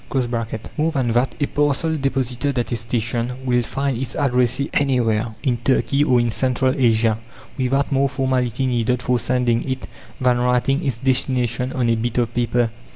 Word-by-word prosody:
More 160 +2 +1
than 130 -6 0
that: 120 +3 +1
a 145 - +2
parcel 145 +3 0
deposited 135 -1 -1
at 120 -3 -1
a - - +1
station 115 +1 -2
will 125 -1 +2
find 135 +3 -2
its 125 -3 -4
addressee 125 +1 +1
anywhere, 115 -5 +1
in 125 -3 +1
Turkey 135 +3 +1
or 125 -4 +3
in 120 -1 +1
Central 130 +2 +1
Asia, 115 -4 +2 0.4
without 135 +2 0
more 140 0 +2
formality 130 -1 0
needed 125 0 0
for 125 -1 +1
sending 125 -2 +1
it 130 0 -3 0.3
than 125 -1 +2
writing 125 +4 +1
its 135 -6 -1
destination 125 -1 0
on 125 -2 0
a 115 - +3
bit 115 +1 -2
of 120 -1 0
paper. 120 -1 +1
125 Hz, 165 wpm, -21 LUFS, 120-135 Hz, 0.4 s, or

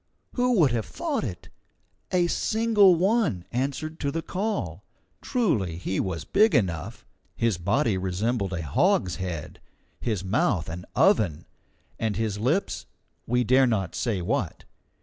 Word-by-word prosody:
who 250 0 +2
would 150 -8 +5
have 115 -2 -1
thought 310 - -2
it? 95 -9 -6 0.6
a 180 -1 +3
single 215 0 +4
one 185 - +1
answered 140 +6 -3
to 140 - -1
the 165 +3 -3
call. 180 - -3 0.4
Truly 110 - 0
he 95 +2 -2
was 95 -4 -2
big 210 -4 +4
enough. 90 - -1 0.3
His 115 -6 0
body 100 - +1
resembled 100 +3 -1
a 85 -2 -3
hogshead, 95 - 0 0.4
his 105 -6 -2
mouth 105 - +1
an 90 +2 -6
oven, 85 -9 +3 0.5
and 110 -2 -1
his 110 -2 -2
lips 150 - -1 0.4
we 125 +1 +2
dare 130 +3 +4
not 100 -7 -1
say 105 -7 -1
what. 105 - -2
115 Hz, 135 wpm, -26 LUFS, -, 0.6 s, would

